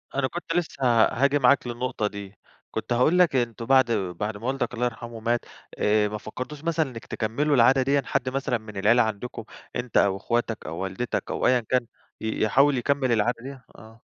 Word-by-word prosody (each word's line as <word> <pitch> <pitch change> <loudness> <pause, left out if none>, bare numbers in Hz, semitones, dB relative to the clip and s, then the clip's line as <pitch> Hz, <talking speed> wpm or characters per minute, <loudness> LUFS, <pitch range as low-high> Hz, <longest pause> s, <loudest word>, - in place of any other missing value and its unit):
أنا 135 -1 +1
كنت 170 +2 -5
لسه 165 -5 -2 0.2
هاجي 140 +4 +1
معاك 130 0 +4
للنقطة 120 -2 -2
دي، 100 -1 -8 0.4
كنت 110 +2 -3
هاقول 150 +9 +3
لك 175 -6 +4
أنتم 115 -2 -1
بَعد 130 -2 +4
بَعد 100 0 -2
ما 115 +4 -6
والدك 130 -3 -1
الله 125 +1 -1
يرحمه 120 -1 -5
مات، 120 +1 -1 0.3
آآ 105 0 +2
ما 105 +1 -4
فكّرتوش 130 +8 -7
مثلًا 160 -3 0
إنك 115 -3 -9
تكمّلوا 140 +7 0
العادة 130 +2 +5
دِيًا، 140 +2 +2
حد 130 - -1
مثلًا 135 -1 -1
من 110 -2 -11
العيلة 110 +5 +4
عَندكم 110 +2 -5 0.3
أنت 120 -1 -2
أو 95 -1 +3
أخواتك 115 +1 -2
أو 80 +2 -5
والدتك 95 +6 -3
أو - - 0
أيًا 125 0 +4
كان 120 +1 0 0.4
ي 110 0 -3
يحاول 135 +6 +4
يكمّل 130 +1 0
العادة 115 +1 +1
دِيّة؟ 135 -1 -9
آه. 110 +1 -15
120 Hz, 190 wpm, -25 LUFS, 110-135 Hz, 0.4 s, العادة